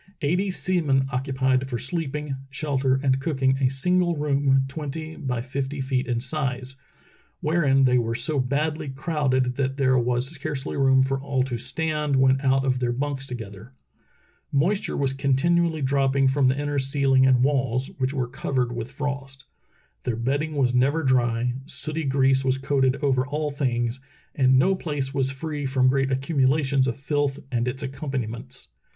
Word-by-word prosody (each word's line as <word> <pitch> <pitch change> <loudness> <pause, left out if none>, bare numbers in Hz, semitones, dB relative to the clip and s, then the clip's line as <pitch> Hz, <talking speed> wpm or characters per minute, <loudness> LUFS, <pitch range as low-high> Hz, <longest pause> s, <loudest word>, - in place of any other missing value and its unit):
Eighty 180 +7 +1
sea 185 -1 0
men 135 -3 +2
occupied 130 0 0
for 120 - -2
sleeping, 150 +2 -3
shelter, 135 -2 0
and 135 -1 +2
cooking 135 -2 0
a 130 -2 +3
single 175 +6 +2
room 140 -2 +2
twenty 155 +2 -6
by 125 -3 -3
fifty 135 +2 -4
feet 130 -1 -1
in 120 -2 0
size, 130 -1 -2 0.6
wherein 150 -4 +2
they 125 -1 +4
were 115 -1 -1
so 150 +4 0
badly 150 +4 -1
crowded 135 -3 0
that 135 0 -1
there 130 -2 +3
was 120 +1 0
scarcely 150 -2 -4
room 135 -1 +4
for 135 0 -1
all 135 -2 0
to 130 -2 -3
stand 150 0 -1
when 130 0 +3
out 135 -1 +2
of 130 -1 +1
their 125 -1 0
bunks 135 +2 -3
together. 110 -1 -8 0.8
Moisture 175 +9 0
was 135 -1 +1
continually 155 +4 +1
dropping 135 0 +2
from 135 0 +3
the 130 +2 +1
inner 145 -1 -1
ceihng 135 -1 +3
and 125 -1 +4
walls, 130 -2 0
which 130 0 0
were 130 -3 -2
covered 125 -1 -2
with 120 0 -5
frost. 135 -2 -5 0.6
Their 125 - -2
bedding 140 +7 -1
was 130 -3 +2
never 140 +6 +2
dry, 120 -2 +1
sooty 155 +4 -2
grease 135 0 +2
was 130 0 +1
coated 135 -1 +1
over 130 -3 +2
all 150 +1 -2
things, 125 -3 -1 0.3
and 130 -1 +4
no 185 +9 +4
place 145 -7 -3
was 135 -2 +1
free 145 +1 -4
from 130 -1 +3
great 135 0 +1
accumulations 135 0 +1
of 120 - -2
filth 145 0 -1
and 120 -1 0
its 130 +3 -3
accompaniments. 130 -3 -5
135 Hz, 165 wpm, -24 LUFS, 130-145 Hz, 0.8 s, they